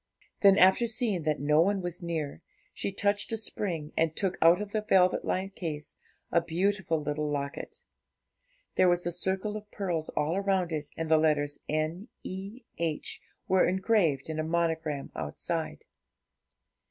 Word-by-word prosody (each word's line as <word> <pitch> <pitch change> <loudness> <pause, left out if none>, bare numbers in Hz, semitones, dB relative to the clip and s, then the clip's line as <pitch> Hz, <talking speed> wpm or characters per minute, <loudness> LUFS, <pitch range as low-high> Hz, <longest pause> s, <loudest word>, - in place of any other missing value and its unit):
Then, 195 -1 +7
after 190 +6 +6
seeing 225 -5 0
that 155 -1 +1
no 150 +2 +4
one 200 +3 +2
was 175 -1 -4
near, 160 -4 -3 0.3
she - - -3
touched 205 +2 +1
a - - 0
spring, 175 -8 -3
and 160 -1 +1
took 190 -3 0
out 170 +3 +6
of 205 -1 -5
the 215 - 0
velvet 185 -3 +3
lined 190 +1 -2
case 150 -5 -5 0.4
a 170 - +4
beautiful 175 0 0
little 150 0 -2
locket. 140 -1 -4 0.9
There 185 - +6
was 175 0 +1
a 175 - 0
circle 190 +4 -1
of 210 0 -7
pearls 175 -7 -2
all 160 +6 +1
round 190 -3 +1
it, 150 -2 -3
and 165 - -2
the 160 0 +5
letters 145 -2 +1
N.E.H. 185 - -4 0.3
were 190 -1 +4
engraved 185 - +2
in 160 0 -3
a - - 0
monogram 160 -3 -1
outside. 75 0 -4
175 Hz, 155 wpm, -29 LUFS, 155-195 Hz, 0.9 s, Then